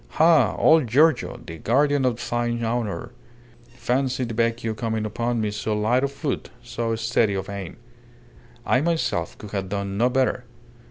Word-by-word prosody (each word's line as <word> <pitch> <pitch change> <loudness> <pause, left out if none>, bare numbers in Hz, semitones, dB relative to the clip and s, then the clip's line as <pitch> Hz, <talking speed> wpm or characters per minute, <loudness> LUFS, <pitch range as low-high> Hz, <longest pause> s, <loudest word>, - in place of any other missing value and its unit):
"Ha! 160 0 +5
Old 160 -5 +5
Giorgio 145 +4 +3
the 80 -1 -8
guardian 140 +3 +2
of 125 -2 -1
thine 120 0 -1
honour! 115 -6 -2 0.6
Fancy 130 +1 0
the 115 -2 -4
Vecchio 115 0 0
coming 110 0 -2
upon 120 +2 -1
me 105 -1 -1
so 105 +1 -2
light 120 +5 +2
of 140 - 0
foot, 140 0 -4
so 115 -1 -2
steady 115 -2 +1
of 95 - -3
aim. 100 -3 -7 0.9
I 130 - +3
myself 125 - -1
could 105 - -10
have 95 -2 -3
done 100 0 -3
no 120 +2 +4
better. 125 -1 0
120 Hz, 160 wpm, -24 LUFS, 110-130 Hz, 0.9 s, Ha